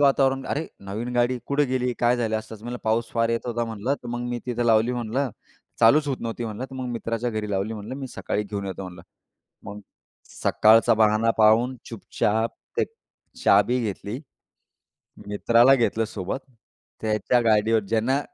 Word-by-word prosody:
वातावरण. 135 -1 +3
"अरे! 155 +3 -2 0.2
नवीन 115 +5 -4
गाडी 120 +1 +2
कुठे 145 +1 +2
गेली? 125 -1 -1
काय 120 +1 +3
झालं?" 110 -2 0
असतच. 110 0 -10
म्हटलं, 120 +1 -5
"पाऊस 115 +1 +1
फार 115 -1 +1
येत 115 +1 -2
होता 120 -1 -1
म्हणलं 115 +4 -2
तर 120 - -8
मग 120 0 -3
मी 120 - -2
तिथे 120 -1 -1
लावली 115 +2 +4
म्हणलं 125 +3 -2 0.5
चालूच 145 +7 +5
होत 135 - -1
नव्हती 115 +1 -4
म्हणलं 110 +2 -5
तर - - -9
मग 130 -1 -4
मित्राच्या 115 +1 -2
घरी 110 -2 -3
लावली 100 +2 -1
म्हंटलं 110 +4 -7
मी 135 -1 -5
सकाळी 105 -3 -3
घेऊन 100 -1 -5
येतो 95 0 -5
म्हणलं." 90 -2 -9 0.6
मग 100 +1 -8 0.6
सकाळचा 115 +1 +5
बाहाना 110 +1 +3
पाहून 115 +4 +4
चुपचाप 110 0 -1 0.3
ते - - +4 0.6
चाबी 125 +1 +4
घेतली. 105 +3 -4 1.1
मित्राला 115 +5 +4
घेतलं 115 -3 +1
सोबत, 105 +1 -4 0.6
त्याच्या 110 +3 +1
गाडीवर 110 0 +3
ज्यांना 115 +6 +1
115 Hz, 165 wpm, -24 LUFS, 110-125 Hz, 1.1 s, चालूच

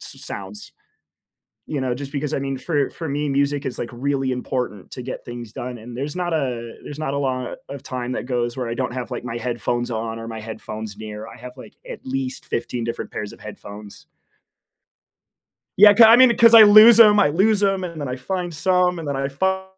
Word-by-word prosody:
s - - -12
sounds. 100 +1 -8 1.0
You 145 - -3
know, 130 -2 -1
just 140 +2 -8
because, 145 +1 -3
I - - 0
mean, 135 -1 -3
for 145 -1 -1
for 165 -2 -7
me, 145 +1 -2
music 140 +1 0
is, 130 - -3
like, 120 - -4
really 135 +1 -1
important 125 -5 -4
to 125 - -7
get 130 - -7
things 120 -2 -8
done 125 +1 -6
and 120 +2 -10
there's 145 +5 -4
not 175 -1 -2
a 125 -7 -3
there's 145 - -9
not 150 -3 -3
a - - -1
lot 130 -3 -3
of 140 -1 -8
time 125 -1 -5
that - - -4
goes 120 -2 -2
where 125 -2 -3
I 115 - -3
don't 120 - -3
have, 125 0 -5
like, 120 - -5
my 120 -1 -5
headphones 120 0 -2
on 115 0 -4
or 115 - -8
my 110 -1 -7
headphones 110 -1 -7
near; 110 0 -8
I - - -12
have, 125 +2 -11
like, 130 - -13
at - - -9
least 130 0 -4
15 120 0 -3
different 115 - -5
pairs 105 -1 -5
of - - -15
headphones. 105 -1 -11 1.7
Yeah, 205 +1 +9
'ca 225 +1 +7
I 230 - +8
mean, 255 -2 +6
'cause 230 0 +6
I 225 - +11
lose 215 +2 +9
'em 210 -2 +7
I 195 - +4
lose 200 +7 +2
'em, 195 -2 +1
and 170 -3 -7
then 140 - -4
I 125 - -4
find 175 +6 -4
some, 180 +2 +1
and 160 - -7
then 140 - -2
I 135 0 -2
fi 190 +7 -1
130 Hz, 225 wpm, -21 LUFS, 120-160 Hz, 1.7 s, I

